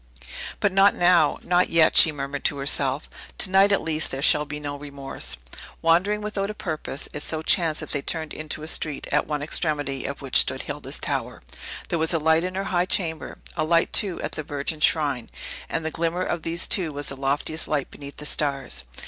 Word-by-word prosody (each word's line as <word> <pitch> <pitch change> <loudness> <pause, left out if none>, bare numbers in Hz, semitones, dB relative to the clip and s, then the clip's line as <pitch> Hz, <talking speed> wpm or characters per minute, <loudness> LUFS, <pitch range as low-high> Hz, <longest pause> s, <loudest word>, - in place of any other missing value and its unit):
"But 205 - +2
not 195 +2 +5
now; 175 -4 +4
not 180 0 +2
yet," 165 -1 +4
she 160 - +8
murmured 140 -1 -5
to 145 - +2
herself. 140 0 0 0.3
"To 185 - +4
night, 195 +1 +5
at 200 - +2
least, 155 -1 0
there 135 - -3
shall 150 0 +5
be 150 0 -6
no 145 -1 -5
remorse!" 140 - -5 0.5
Wandering 185 +6 +3
without 205 -1 -2
a 215 - -5
purpose, 160 -8 -4
it 150 - -5
so 155 +1 -2
chanced 160 -2 +2
that - - -7
they 145 - -1
turned 160 +1 -3
into 155 0 -5
a - - -6
street, 155 -3 -1
at - - +1
one 150 -1 -2
extremity 145 -3 -1
of 140 0 -5
which 135 - +3
stood - - +1
Hilda's - - -4
tower. - - -4 0.5
There 170 - 0
was 160 +2 +2
a - - +4
light 160 +1 +3
in 185 0 -3
her 195 - -1
high 175 +1 +2
chamber; 160 -5 -1 0.2
a - - 0
light, 165 +1 +2
too, 195 -4 +2
at - - -3
the - - -3
Virgin's 150 0 0
shrine; 140 -7 0 0.4
and 160 - -2
the 160 - -1
glimmer 170 +3 -1
of 175 -2 -2
these 165 +2 +2
two 175 -6 +1
was 145 0 -2
the 135 - -3
loftiest 140 +4 -1
light 145 -3 -2
beneath 140 0 -10
the 150 - -7
stars. 140 - 0
155 Hz, 210 wpm, -24 LUFS, 145-170 Hz, 0.5 s, she